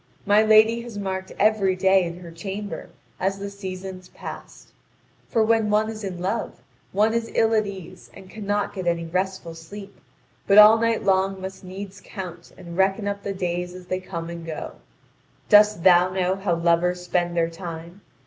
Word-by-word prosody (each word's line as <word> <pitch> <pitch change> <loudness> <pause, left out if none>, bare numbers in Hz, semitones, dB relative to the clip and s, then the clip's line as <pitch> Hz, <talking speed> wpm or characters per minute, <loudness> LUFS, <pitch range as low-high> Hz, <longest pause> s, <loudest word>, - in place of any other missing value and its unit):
My 205 +1 +5
lady 220 +2 +5
had 235 -3 -9
marked 190 -1 -4
every 205 -3 +3
day 190 0 +4
in 170 +1 -6
her 170 -2 -10
chamber, 195 +4 -6 0.3
as 195 +1 0
the 200 0 -6
seasons 190 -2 -7
passed: - - -10 0.6
for 225 -3 +2
when 220 -1 +2
one 215 +1 +2
is 215 -1 -8
in 190 -3 -4
love, 195 - -3 0.3
one 215 +3 +2
is 230 0 -1
ill 225 0 +3
at 215 -2 +2
ease 185 -2 -10
and 190 - -12
cannot 205 0 -2
get 185 -3 -5
any 170 -1 0
restful 185 0 -3
sleep, 195 +5 -11 0.5
but 200 - +5
all 215 +1 +9
night 230 0 +1
long 190 0 +1
must 190 +1 -8
needs 190 +1 -8
count 175 -3 -8
and 170 -2 -9
reckon 195 +2 +1
up 200 0 -3
the 200 - -4
days 180 -1 -3
as 185 -1 -10
they 185 +1 -2
come 170 -3 -6
and 170 -1 -7
go. 160 -1 -6 0.8
Dost 210 -3 +6
thou 180 -1 +6
know 185 0 0
how 190 -3 -1
lovers 170 +1 +1
spend 175 -1 -1
their 165 0 +1
time? 170 +2 -8
190 Hz, 180 wpm, -24 LUFS, 180-205 Hz, 0.8 s, all